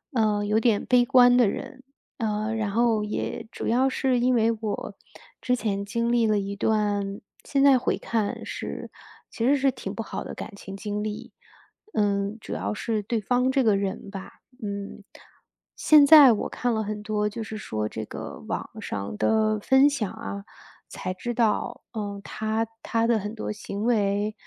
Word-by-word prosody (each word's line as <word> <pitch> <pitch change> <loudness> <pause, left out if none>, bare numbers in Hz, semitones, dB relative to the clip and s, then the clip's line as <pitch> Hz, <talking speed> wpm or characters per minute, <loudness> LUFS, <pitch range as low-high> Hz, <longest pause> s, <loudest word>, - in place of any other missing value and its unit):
呃， 210 -2 +2
有 210 +1 +1
点 220 -4 +2
悲 250 -1 +4
观 245 -1 +6
的 240 -5 +5
人。 260 +5 -7 0.3
呃， 215 -1 -1
然 215 -2 -1
后 225 -1 +2
也 210 - -4
主 - - -5
要 255 +4 +3
是 260 -1 +1
因 255 +1 +3
为 225 -2 +3
我 215 -2 -4 0.5
之 250 0 +1
前 200 -4 -2
经 235 +4 -1
历 235 -1 +3
了 215 -1 +2
一 200 0 -4
段 205 -2 0 0.2
现 275 -2 0
在 275 -2 +7
回 - - 0
看 220 -3 -2
是 - - -6 0.4
其 230 - -3
实 280 +3 +4
是 275 0 +3
挺 240 -6 -6
不 225 - -4
好 - - -5
的 - - -7
感 210 - -8
情 195 -1 -9
经 210 0 -3
历。 215 -1 -6 0.6
嗯， 200 0 0
主 - - -7
要 - - -2
是 215 0 -2
对 225 +2 -1
方 250 +5 +1
这 270 - +2
个 215 -3 +4
人 195 0 -3
吧 195 -1 -9 0.2
嗯， 200 0 -5 0.7
现 300 -2 +6
在 290 -4 +10
我 215 - -1
看 245 -1 -1
了 220 - 0
很 210 0 -4
多， 210 -1 0
就 215 +2 -5
是 215 0 -6
说 110 - -3
这 110 0 -5
个 - - -8
网 - - -3
上 100 +1 -5
的 215 - +2
分 265 +6 +5
享 245 -9 -2
啊， 220 -3 -6 0.5
才 185 - -4
知 240 +6 -4
道， 230 -3 0
嗯， 205 -2 -4
他 220 +1 -2 0.2
他 230 0 0
的 230 -2 +3
很 210 +2 -5
多 215 - -4
行 205 -1 -5
为， 210 -2 +1
215 Hz, 195 characters per minute, -25 LUFS, 205-240 Hz, 0.7 s, 在